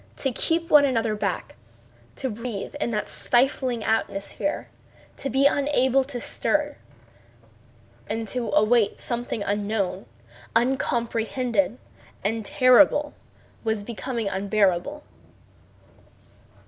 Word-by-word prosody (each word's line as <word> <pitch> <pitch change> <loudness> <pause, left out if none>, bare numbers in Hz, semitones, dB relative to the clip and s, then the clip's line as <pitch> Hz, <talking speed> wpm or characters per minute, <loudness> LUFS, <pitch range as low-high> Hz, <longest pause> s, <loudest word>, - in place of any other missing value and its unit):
To 270 - -1
keep 330 +6 -1
one 295 -1 +8
another 230 -5 +1
back, 210 - -3 0.6
to 265 - -3
breathe 225 -2 -5
in - - 0
that 210 -2 -2
stifling 250 -2 +1
atmosphere, 220 +5 -2 0.5
to 275 - -4
be 270 +2 +2
unable 270 -2 +3
to 260 -3 -5
stir, 295 +4 0 1.3
and 225 +1 -3
to 245 -3 -2
await 215 +1 +3
something 240 -3 -3
unknown, 200 -2 -2 0.5
uncomprehended, 235 -3 0 0.5
and 220 +3 -1
terrible, 270 +6 +4 0.5
was 220 -2 -1
becoming 235 0 -4
unbearable. 200 +7 0
235 Hz, 95 wpm, -25 LUFS, 215-265 Hz, 1.3 s, one